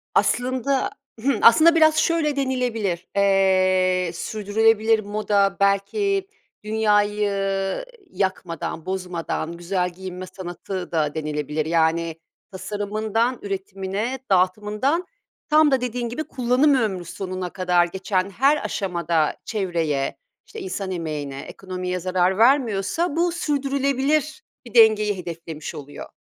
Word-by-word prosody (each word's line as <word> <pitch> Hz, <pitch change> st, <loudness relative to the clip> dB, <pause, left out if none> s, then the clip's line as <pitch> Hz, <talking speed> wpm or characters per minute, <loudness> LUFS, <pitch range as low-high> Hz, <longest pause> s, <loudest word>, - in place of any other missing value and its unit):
Aslında 260 Hz, +2 st, +1 dB, 0.3 s
Hımm, 275 Hz, +2 st, +1 dB
aslında 320 Hz, +8 st, +7 dB
biraz 315 Hz, -1 st, +5 dB
şöyle 315 Hz, -3 st, +2 dB
denilebilir. 245 Hz, -9 st, -1 dB
Eee, 185 Hz, -2 st, +3 dB
"sürdürülebilir 220 Hz, +3 st, +2 dB
moda 205 Hz, -1 st, 0 dB
belki 385 Hz, -, +1 dB, 0.4 s
dünyayı 210 Hz, -1 st, +1 dB, 0.8 s
yakmadan, 170 Hz, -, -3 dB
bozmadan, 180 Hz, -3 st, -3 dB
güzel 180 Hz, +1 st, -1 dB
giyinme 185 Hz, +1 st, -8 dB
sanatı." 180 Hz, 0 st, -6 dB
da 155 Hz, -2 st, 0 dB
denilebilir. 150 Hz, 0 st, -2 dB
Yani, 165 Hz, 0 st, +1 dB, 0.4 s
tasarımından, 215 Hz, +5 st, -2 dB
üretimine, 195 Hz, +5 st, -4 dB
dağıtımından, 210 Hz, -, +1 dB, 0.4 s
tam 305 Hz, -1 st, +5 dB
da 260 Hz, -2 st, +2 dB
dediğin 245 Hz, -1 st, -3 dB
gibi 310 Hz, +7 st, -3 dB
kullanım 255 Hz, +3 st, +2 dB
ömrü 195 Hz, -8 st, -1 dB
sonuna 185 Hz, 0 st, -5 dB
kadar 180 Hz, -2 st, +2 dB
geçen 185 Hz, +1 st, -2 dB
her 275 Hz, +9 st, +2 dB
aşamada 170 Hz, -5 st, 0 dB
çevreye, 165 Hz, -9 st, -1 dB, 0.3 s
işte, 445 Hz, -, -9 dB
insan 205 Hz, -, -4 dB
emeğine, 150 Hz, -5 st, -4 dB
ekonomiye 185 Hz, -1 st, -5 dB
zarar 185 Hz, +1 st, +1 dB
vermiyorsa 250 Hz, -, +2 dB
bu 345 Hz, +1 st, +2 dB
sürdürülebilir 280 Hz, -, 0 dB, 0.2 s
bir 235 Hz, -, -12 dB
dengeyi 215 Hz, -3 st, +5 dB
hedeflemiş 165 Hz, -3 st, -7 dB
oluyor. 140 Hz, -, -9 dB
200 Hz, 105 wpm, -23 LUFS, 180-250 Hz, 0.8 s, aslında